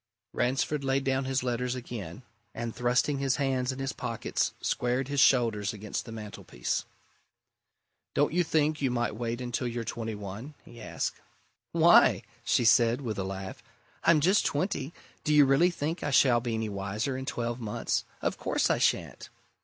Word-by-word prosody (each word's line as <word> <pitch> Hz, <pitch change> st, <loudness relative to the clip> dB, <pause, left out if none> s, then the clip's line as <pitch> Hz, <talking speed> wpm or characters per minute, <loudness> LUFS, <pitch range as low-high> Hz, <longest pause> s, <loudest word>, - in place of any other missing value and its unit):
Ransford 135 Hz, +4 st, 0 dB
laid 135 Hz, 0 st, +1 dB
down 135 Hz, 0 st, 0 dB
his 130 Hz, -1 st, -1 dB
letters 125 Hz, 0 st, -1 dB
again, 120 Hz, -5 st, -7 dB, 0.3 s
and 115 Hz, 0 st, -4 dB
thrusting 125 Hz, +3 st, +1 dB
his 135 Hz, -1 st, +1 dB
hands 130 Hz, -2 st, 0 dB
in 130 Hz, -, -7 dB
his 135 Hz, 0 st, -3 dB
pockets, 115 Hz, -2 st, -2 dB
squared 125 Hz, +2 st, -1 dB
his 140 Hz, 0 st, 0 dB
shoulders 115 Hz, -5 st, +3 dB
against 105 Hz, 0 st, -5 dB
the 115 Hz, -, -9 dB
mantelpiece. 105 Hz, -, -4 dB, 1.3 s
"Don't -, -, +2 dB
you 175 Hz, +1 st, +3 dB
think 155 Hz, -2 st, +1 dB
you 135 Hz, -, +2 dB
might 120 Hz, -3 st, -1 dB
wait 120 Hz, +1 st, -3 dB
until 120 Hz, 0 st, -2 dB
you're 120 Hz, 0 st, -3 dB
twenty 115 Hz, -1 st, -4 dB
one?" 105 Hz, +8 st, -8 dB
he 120 Hz, -, -13 dB
asked. -, -, -4 dB, 0.5 s
"Why?" -, -, +6 dB, 0.2 s
she 120 Hz, -, +2 dB
said, 115 Hz, +2 st, +4 dB
with 110 Hz, -6 st, -4 dB
a -, -, -1 dB
laugh. 95 Hz, +5 st, -6 dB, 0.4 s
"I'm 165 Hz, -2 st, +5 dB
just 190 Hz, +7 st, +4 dB
twenty 145 Hz, -2 st, -1 dB, 0.3 s
do 150 Hz, -, +2 dB
you 145 Hz, -1 st, +8 dB
really 135 Hz, +7 st, +4 dB
think 165 Hz, 0 st, -3 dB
I 145 Hz, -, -1 dB
shall 130 Hz, -3 st, +5 dB
be 120 Hz, -1 st, -2 dB
any 110 Hz, 0 st, -2 dB
wiser 105 Hz, +6 st, -3 dB
in 130 Hz, +1 st, -5 dB
twelve 120 Hz, -2 st, -2 dB
months? 110 Hz, -3 st, -2 dB, 0.2 s
Of -, -, -1 dB
course -, -, +1 dB
I -, -, +1 dB
shan't!" -, -, 0 dB
125 Hz, 170 wpm, -29 LUFS, 115-135 Hz, 1.3 s, you